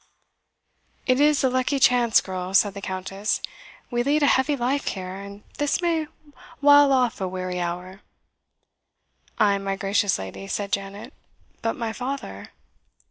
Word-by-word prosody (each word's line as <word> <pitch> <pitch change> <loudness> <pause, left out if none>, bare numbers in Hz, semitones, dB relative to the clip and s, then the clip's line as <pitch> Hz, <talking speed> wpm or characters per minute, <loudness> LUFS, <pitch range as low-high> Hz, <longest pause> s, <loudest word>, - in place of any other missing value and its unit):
"It 255 0 +2
is 295 0 +4
a 260 - +4
lucky 255 +2 +1
chance, 245 -3 +4
girl," 185 0 -5
said 200 0 +4
the 200 - -8
Countess; 195 +2 -2 0.5
"we 240 0 +1
lead 290 +4 +2
a - - +6
heavy 280 +1 +3
life 265 +3 -1
here, 185 -2 -4
and 200 +1 -9 0.2
this 290 -1 +1
may 330 -3 0 0.5
while 285 0 +6
off 250 -5 +1
a 190 - 0
weary 185 -1 -4
hour." 180 +3 -5 1.4
"Ay, 200 -1 +3
my 195 0 -2
gracious 195 0 +1
lady," 95 - -7
said 200 0 -3
Janet; 200 +2 -4 0.5
"but 225 - -1
my 225 -2 -3
father?" 245 - -5
210 Hz, 145 wpm, -24 LUFS, 190-265 Hz, 1.4 s, a